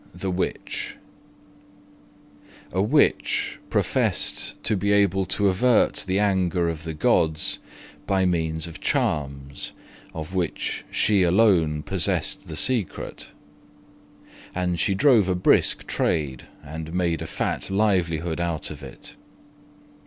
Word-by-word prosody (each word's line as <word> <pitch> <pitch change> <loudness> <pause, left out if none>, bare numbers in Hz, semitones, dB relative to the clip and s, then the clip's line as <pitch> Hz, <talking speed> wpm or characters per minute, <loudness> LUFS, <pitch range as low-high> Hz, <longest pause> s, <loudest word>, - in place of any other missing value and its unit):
THE 95 - -3
WITCH 90 +1 -3 1.7
A 95 - 0
Witch 140 +9 +2
professed - - +1
to 110 - +1
be 100 +1 0
able 95 -2 +3
to 100 - +2
avert 110 +5 +2
the 95 +1 +1
anger 95 -4 +1
of 80 0 -5
the 80 -1 -4
gods 80 -3 +1 0.5
by 95 -1 +2
means 80 -2 0
of 85 -1 -9
charms, 70 -2 -2 0.4
of 80 +3 -6
which 85 -5 -2
she 105 -2 +2
alone 85 -5 +3
possessed 95 -1 +1
the 80 - -6
secret; 115 - -1 1.3
and 90 -1 -1
she 95 - +1
drove 115 -4 +4
a 90 - +2
brisk 90 - +2
trade, 70 -6 -1 0.2
and 80 +2 -7
made 85 -3 0
a - - -4
fat - - -3
livelihood 90 -5 0
out 85 -2 -2
of - - -9
it. - - -10
90 Hz, 120 wpm, -24 LUFS, 80-95 Hz, 1.7 s, drove